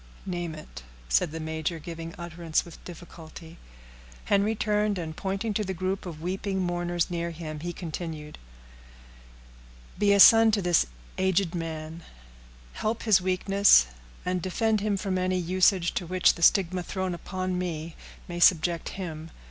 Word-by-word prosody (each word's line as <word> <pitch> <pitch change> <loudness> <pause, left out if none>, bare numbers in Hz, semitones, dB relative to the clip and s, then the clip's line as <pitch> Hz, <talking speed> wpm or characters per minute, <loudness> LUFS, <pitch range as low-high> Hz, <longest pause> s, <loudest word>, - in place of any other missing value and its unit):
"Name 175 -3 -4
it," 155 - -11 0.3
said - - +2
the 165 - -5
major, 160 +1 -3
giving 165 +1 -8
utterance 170 -1 -2
with 170 - -13
difficulty. 165 -1 -11 0.7
Henry 205 +2 +2
turned, 210 -1 0
and 160 -3 -5
pointing 195 +4 -2
to 210 - 0
the 190 -1 -4
group 185 +2 -3
of 160 -2 -8
weeping 190 +2 -2
mourners 175 -1 -1
near 170 0 -2
him, 155 -2 -7
he 175 +3 -4
continued,— 160 -3 -7 1.6
"Be 205 -1 +4
a 200 - +4
son 225 +2 +9
to 205 - +2
this 175 - +3 0.3
aged 190 -1 +1
man; 165 -1 -5 0.7
help 220 +1 -2
his 210 -5 +4
weakness, 190 - +4 0.4
and 180 0 -1
defend 215 +4 0
him 205 -1 0
from 190 -1 -2
any 185 0 0
usage 180 0 +2
to 175 - -3
which 185 +1 +3
the 170 - -11
stigma 185 0 +3
thrown 185 0 -3
upon 185 +1 -4
me 165 -2 -4 0.3
may 175 -1 -5
subject 170 -1 +3
him. 165 -4 -6
175 Hz, 150 wpm, -27 LUFS, 165-190 Hz, 1.6 s, son